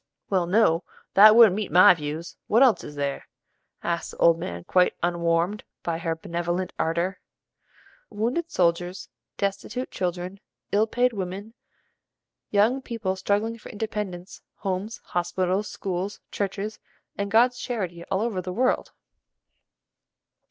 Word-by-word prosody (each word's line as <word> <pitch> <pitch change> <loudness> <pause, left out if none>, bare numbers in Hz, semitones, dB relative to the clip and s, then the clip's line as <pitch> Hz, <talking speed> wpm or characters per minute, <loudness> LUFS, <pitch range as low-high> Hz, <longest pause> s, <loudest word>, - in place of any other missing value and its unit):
"Well, 185 -3 +2
no, 180 -3 +3 0.3
that 215 +2 +9
wouldn't 225 -5 +8
meet 210 -5 -3
my 180 +2 +8
views. 155 +1 -6
What 230 +5 +5
else 225 -10 +4
is 150 - -9
there?" 140 -1 -3 0.6
asked 170 0 -2
the - - -11
old 165 -1 +4
man 180 0 -5
quite 180 +1 +3
unwarmed 170 +3 0 0.2
by 165 -1 -2
her 165 -1 -1
benevolent 175 +2 -3
ardor. 170 +3 0 0.9
"Wounded 250 +11 -2
soldiers, 175 - 0 0.3
destitute 200 +5 -3
children, 180 +1 -3 0.3
ill 215 +2 +3
paid 245 +2 +1
women, 195 +2 -5 1.0
young 220 +6 +3
people 230 -7 -3
struggling 205 +4 -1
for - - -11
independence, 205 -4 -5
homes, 195 +2 -3
hospitals, 185 +3 -1
schools, 190 +1 -4
churches, 205 +2 -3 0.4
and 200 0 -3
God's 245 +4 +4
charity 185 -10 -4
all 190 - -1
over 220 -5 -1
the 180 0 -5
world." 250 +7 0
190 Hz, 130 wpm, -25 LUFS, 175-215 Hz, 1.0 s, that